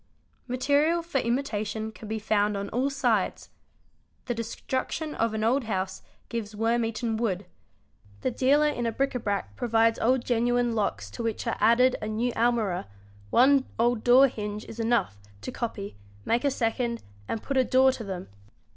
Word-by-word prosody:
Material 285 Hz, +7 st, +2 dB
for 330 Hz, -5 st, -1 dB
imitation 220 Hz, -4 st, -2 dB
can 220 Hz, 0 st, -11 dB
be 220 Hz, +1 st, -2 dB
found 210 Hz, -1 st, +1 dB
on 200 Hz, 0 st, -4 dB
all 255 Hz, +4 st, 0 dB
sides; 245 Hz, -8 st, 0 dB, 0.7 s
the 245 Hz, -, -1 dB
destruction 260 Hz, +6 st, -3 dB
of 225 Hz, -1 st, 0 dB
an 215 Hz, -, -1 dB
old 245 Hz, +3 st, +2 dB
house 190 Hz, -3 st, -3 dB, 0.3 s
gives 220 Hz, -2 st, -5 dB
worm 230 Hz, +2 st, +1 dB
eaten 225 Hz, 0 st, -2 dB
wood; 205 Hz, -4 st, -1 dB, 0.8 s
the -, -, 0 dB
dealer 275 Hz, +5 st, +3 dB
in 240 Hz, -5 st, -1 dB
bric 275 Hz, 0 st, +1 dB
a 250 Hz, -, -2 dB
brac 205 Hz, -3 st, -3 dB
provides 230 Hz, -2 st, +2 dB
old 250 Hz, +1 st, +2 dB
genuine 245 Hz, 0 st, +1 dB
locks 105 Hz, -, -2 dB
to -, -, -6 dB
which 230 Hz, 0 st, -2 dB
are 230 Hz, -, 0 dB
added 250 Hz, +3 st, +4 dB
a 215 Hz, -, -3 dB
new 225 Hz, +3 st, -1 dB
almirah; 225 Hz, -, +1 dB, 0.4 s
one 265 Hz, -, +5 dB
old 235 Hz, -1 st, +1 dB
door 255 Hz, +3 st, +7 dB
hinge 210 Hz, -3 st, -5 dB
is 230 Hz, -, -10 dB
enough, 225 Hz, -, +1 dB, 0.2 s
to 105 Hz, -, -6 dB
copy, 205 Hz, -, -5 dB, 0.3 s
make 235 Hz, +3 st, +1 dB
a 285 Hz, -, +3 dB
second, 235 Hz, -2 st, -1 dB, 0.2 s
and 225 Hz, -, -3 dB
put 275 Hz, -, -3 dB
a 260 Hz, -, +5 dB
door 260 Hz, +1 st, +4 dB
to 250 Hz, -, -6 dB
them. 190 Hz, -3 st, -6 dB
230 Hz, 170 wpm, -27 LUFS, 215-255 Hz, 0.8 s, door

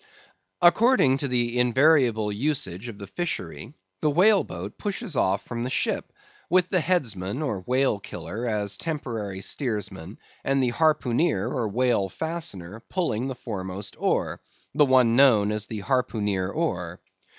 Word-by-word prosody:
According 175 Hz, -, +5 dB
to 140 Hz, -, -1 dB
the 120 Hz, -1 st, 0 dB
invariable 125 Hz, -4 st, +3 dB
usage 125 Hz, -, -2 dB
of 115 Hz, -4 st, -8 dB
the 100 Hz, -, -8 dB
fishery, 115 Hz, -, -5 dB, 0.3 s
the 155 Hz, -, +3 dB
whale 190 Hz, +7 st, +5 dB
boat -, -, -8 dB
pushes 205 Hz, -, -4 dB
off 95 Hz, -4 st, +1 dB
from 115 Hz, -1 st, -5 dB
the 125 Hz, -, -2 dB
ship, -, -, -1 dB, 0.4 s
with 180 Hz, 0 st, +4 dB
the 185 Hz, -, +2 dB
headsman 125 Hz, -, -1 dB
or 110 Hz, -10 st, -2 dB
whale 130 Hz, -4 st, +2 dB
killer 100 Hz, +5 st, -6 dB
as 105 Hz, -2 st, -2 dB
temporary 115 Hz, -, -4 dB
steersman, 105 Hz, -, -4 dB, 0.3 s
and 135 Hz, -1 st, +1 dB
the 125 Hz, -, +1 dB
harpooneer 155 Hz, +2 st, +2 dB
or 120 Hz, -5 st, -2 dB
whale 115 Hz, -3 st, +1 dB
fastener 110 Hz, -, -5 dB
pulling 135 Hz, -, -1 dB
the 135 Hz, -, -4 dB
foremost 100 Hz, -4 st, -6 dB
oar, -, -, 0 dB, 0.3 s
the 150 Hz, -, +5 dB
one 125 Hz, -3 st, +4 dB
known 115 Hz, -6 st, +5 dB
as 105 Hz, 0 st, -2 dB
the 110 Hz, -2 st, -5 dB
harpooneer 105 Hz, -7 st, 0 dB
oar. 90 Hz, -, -2 dB
120 Hz, 145 wpm, -25 LUFS, 100-145 Hz, 0.4 s, According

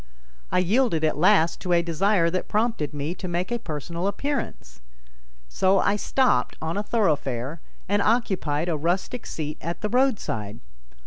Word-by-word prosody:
I 180 Hz, -, +2 dB
yielded 185 Hz, -2 st, +2 dB
at 155 Hz, -, +2 dB
last 170 Hz, -2 st, +4 dB
to 180 Hz, -, 0 dB
a 170 Hz, 0 st, +4 dB
desire 170 Hz, +1 st, +2 dB
that 185 Hz, -, -2 dB
prompted 215 Hz, -, 0 dB
me 145 Hz, +2 st, -3 dB
to 185 Hz, -, -7 dB
make 175 Hz, +4 st, -2 dB
a 240 Hz, -, 0 dB
personal 170 Hz, -, -4 dB
appearance. 200 Hz, -, -4 dB, 0.7 s
So 190 Hz, -, +2 dB
I 200 Hz, +2 st, +3 dB
stopped 210 Hz, -, +1 dB
on 160 Hz, +1 st, -3 dB
a 205 Hz, -, 0 dB
thoroughfare 150 Hz, -, -1 dB, 0.3 s
and 205 Hz, +1 st, +2 dB
occupied 190 Hz, -9 st, +1 dB
a 170 Hz, -, 0 dB
rustic 175 Hz, +10 st, -2 dB
seat 150 Hz, -1 st, -5 dB
at 170 Hz, +2 st, -4 dB
the 210 Hz, -, -1 dB
roadside. 200 Hz, -, 0 dB
175 Hz, 155 wpm, -25 LUFS, 155-210 Hz, 0.7 s, last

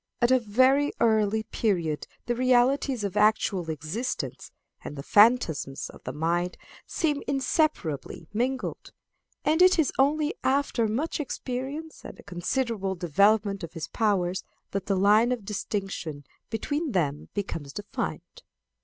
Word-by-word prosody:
At 240 Hz, +1 st, +3 dB
a 260 Hz, -, +6 dB
very 260 Hz, +6 st, +3 dB
early 220 Hz, -1 st, +2 dB
period 175 Hz, -9 st, -1 dB, 0.2 s
the 240 Hz, -, 0 dB
realities 255 Hz, 0 st, +2 dB
of 200 Hz, -1 st, -3 dB
actual 210 Hz, -4 st, +2 dB
existence 160 Hz, -, -4 dB, 0.3 s
and 145 Hz, -, -7 dB
the 140 Hz, -, -6 dB
phantasms 205 Hz, -, +3 dB
of -, -, -16 dB
the -, -, -3 dB
mind 175 Hz, +3 st, -1 dB, 0.3 s
seem 300 Hz, -5 st, 0 dB
inseparably 265 Hz, -, -1 dB
mingled, 255 Hz, +4 st, -2 dB, 0.5 s
and 315 Hz, +3 st, +3 dB
it 365 Hz, 0 st, +7 dB
is 320 Hz, -4 st, +2 dB
only 295 Hz, +3 st, +3 dB
after 265 Hz, -4 st, +1 dB
much 275 Hz, +11 st, -2 dB
experience 280 Hz, +3 st, -5 dB
and -, -, -9 dB
a -, -, -12 dB
considerable 195 Hz, +2 st, -2 dB
development 200 Hz, +4 st, +2 dB
of 165 Hz, -, -7 dB
his 165 Hz, -3 st, -5 dB
powers, 190 Hz, -5 st, 0 dB, 0.3 s
that 195 Hz, -1 st, -3 dB
the 195 Hz, -, +2 dB
line 210 Hz, +5 st, +5 dB
of 235 Hz, -5 st, -2 dB
distinction 195 Hz, -7 st, -4 dB, 0.3 s
between 290 Hz, +5 st, -2 dB
them 150 Hz, -5 st, -1 dB
becomes 165 Hz, -8 st, -4 dB
defined. 205 Hz, -, -5 dB
215 Hz, 135 wpm, -27 LUFS, 180-260 Hz, 0.5 s, it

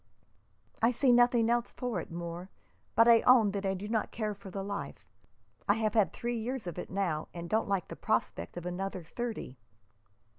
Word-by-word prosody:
"I 230 Hz, -, +5 dB
see 250 Hz, +1 st, +3 dB
nothing 240 Hz, -1 st, +5 dB
else 240 Hz, 0 st, +1 dB
for 245 Hz, -7 st, -2 dB
it, -, -, -10 dB
Moore, 170 Hz, +2 st, -6 dB, 0.5 s
but 230 Hz, -, +6 dB
I 230 Hz, -1 st, +7 dB
own 235 Hz, -5 st, +6 dB
that 195 Hz, 0 st, -2 dB
I 190 Hz, -, 0 dB
do 195 Hz, +3 st, -6 dB
not 220 Hz, -1 st, 0 dB
care 215 Hz, -2 st, -2 dB
for 200 Hz, -1 st, -11 dB
the 195 Hz, +1 st, -4 dB
life. 195 Hz, -, -5 dB, 0.6 s
I 205 Hz, -, +6 dB
have 220 Hz, -1 st, 0 dB
had 215 Hz, -4 st, +3 dB
three 240 Hz, 0 st, -3 dB
years 245 Hz, 0 st, -3 dB
of 175 Hz, 0 st, -5 dB
it -, -, -6 dB
now, 180 Hz, -5 st, -1 dB
and 170 Hz, 0 st, -5 dB
don't 220 Hz, +3 st, 0 dB
like 195 Hz, -3 st, 0 dB
the -, -, -7 dB
prospect 85 Hz, -, -2 dB
of 175 Hz, -, -6 dB
another 185 Hz, 0 st, -3 dB
thirty." 220 Hz, -, -5 dB
205 Hz, 195 wpm, -31 LUFS, 180-235 Hz, 0.6 s, I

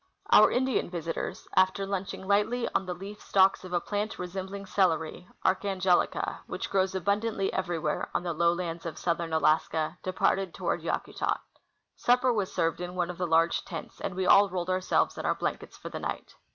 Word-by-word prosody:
Our -, -, +8 dB
Indian 260 Hz, -5 st, 0 dB
visitors, 170 Hz, -2 st, -4 dB
after 190 Hz, +1 st, +3 dB
lunching 195 Hz, -1 st, -4 dB
lightly 210 Hz, +5 st, +2 dB
on 190 Hz, -, 0 dB
the 180 Hz, -, -3 dB
leaf 200 Hz, +4 st, -9 dB
stalks 195 Hz, 0 st, +3 dB
of 185 Hz, -, -9 dB
a 175 Hz, -, +2 dB
plant 205 Hz, +4 st, -3 dB
resembling 190 Hz, +2 st, -5 dB
celery 175 Hz, -3 st, 0 dB, 0.2 s
(Archangelica), 190 Hz, -1 st, +1 dB
which -, -, -5 dB
grows 190 Hz, -1 st, +1 dB
abundantly 200 Hz, +1 st, 0 dB
everywhere 170 Hz, -5 st, -1 dB
on -, -, +1 dB
the 175 Hz, -1 st, -2 dB
lowlands 170 Hz, +1 st, 0 dB
of 155 Hz, -2 st, -6 dB
southern 170 Hz, -1 st, -1 dB
Alaska, 155 Hz, 0 st, +1 dB
departed 185 Hz, 0 st, 0 dB
toward -, -, -1 dB
Yakutat. -, -, -2 dB, 0.6 s
Supper 250 Hz, +1 st, +3 dB
was 205 Hz, -4 st, -1 dB
served 165 Hz, +1 st, 0 dB
in 180 Hz, 0 st, -5 dB
one 180 Hz, -1 st, 0 dB
of 180 Hz, -, -12 dB
the 180 Hz, -, 0 dB
large 165 Hz, +1 st, +3 dB
tents, 165 Hz, -4 st, -8 dB
and 180 Hz, -, -3 dB
we 190 Hz, 0 st, -1 dB
all 200 Hz, +2 st, +6 dB
rolled 180 Hz, 0 st, -2 dB
ourselves 185 Hz, 0 st, +1 dB
in -, -, -4 dB
our -, -, +2 dB
blankets -, -, -4 dB
for -, -, -8 dB
the -, -, -5 dB
night. -, -, -5 dB
185 Hz, 180 wpm, -28 LUFS, 170-195 Hz, 0.6 s, Our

